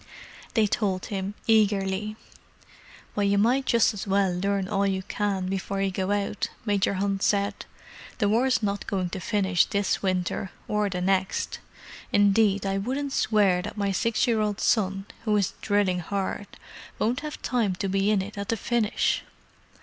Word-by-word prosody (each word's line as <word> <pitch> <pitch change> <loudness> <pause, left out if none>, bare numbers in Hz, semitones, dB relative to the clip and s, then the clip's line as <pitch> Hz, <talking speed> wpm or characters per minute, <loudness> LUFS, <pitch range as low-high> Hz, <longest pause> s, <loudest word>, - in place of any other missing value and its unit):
They 220 -2 +4
told 195 -3 -1
him, 195 +1 -3
eagerly. 210 -1 +2 1.0
"Well, 205 - +1
you 200 0 +3
might 250 +6 +2
just 235 -2 +4
as 205 0 -6
well 195 -1 +2
learn 195 +1 0
all 200 -1 +1
you 190 -1 -1
can 200 -1 -1
before 195 +1 -2
you 195 0 +1
go 190 0 -2
out," 205 0 -1 0.2
Major 200 -2 +1
Hunt 195 0 -1
said. 200 0 0 0.5
"The 210 - +2
war's 240 +3 +2
not 200 -1 -2
going 185 -3 -1
to 190 - -4
finish 190 -1 +2
this 200 -2 0
winter, 185 0 -1 0.2
or 210 -1 +1
the 180 -1 -3
next. 190 +1 0 0.5
Indeed, 205 -1 +3
I 195 0 0
wouldn't 270 +6 -2
swear 200 -7 +3
that 210 +3 -7
my 200 -1 0
six 225 +4 +1
year 230 -3 +2
old 210 -1 -1
son, 195 -3 +1 0.2
who 215 -2 +2
is 200 -2 0
drilling 200 -3 +1
hard, 200 +3 -3 0.5
won't 240 +3 0
have 300 0 -6
time 225 -7 +1
to 195 - -2
be 195 +1 +1
in 205 -3 +2
at 200 0 -6
the 230 - +1
finish!" 230 -1 +1
200 Hz, 165 wpm, -26 LUFS, 195-210 Hz, 1.0 s, They